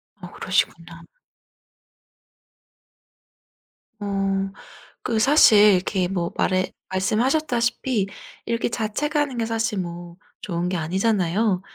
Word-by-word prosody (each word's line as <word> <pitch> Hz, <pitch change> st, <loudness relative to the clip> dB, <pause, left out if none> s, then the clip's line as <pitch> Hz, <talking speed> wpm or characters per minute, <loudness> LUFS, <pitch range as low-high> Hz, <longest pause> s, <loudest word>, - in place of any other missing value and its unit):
아 180 Hz, -3 st, -11 dB
그러시구나. 170 Hz, -2 st, -2 dB, 3.0 s
어 195 Hz, -1 st, -1 dB, 0.5 s
그 225 Hz, -2 st, 0 dB
사실 220 Hz, -6 st, +6 dB
이렇게 185 Hz, 0 st, 0 dB
뭐 175 Hz, -3 st, -2 dB
말해 185 Hz, 0 st, +1 dB, 0.2 s
말씀하셨다시피 235 Hz, +2 st, 0 dB, 0.4 s
이렇게 230 Hz, 0 st, -1 dB
자책 235 Hz, +7 st, -3 dB
하는 290 Hz, -4 st, 0 dB
게 230 Hz, -, 0 dB
사실 225 Hz, -2 st, -1 dB
뭐 175 Hz, -1 st, -7 dB, 0.2 s
좋은 175 Hz, -2 st, -2 dB
게 185 Hz, -, -2 dB
아니잖아요. 190 Hz, +2 st, 0 dB
200 Hz, 215 characters per minute, -23 LUFS, 180-230 Hz, 3.0 s, 사실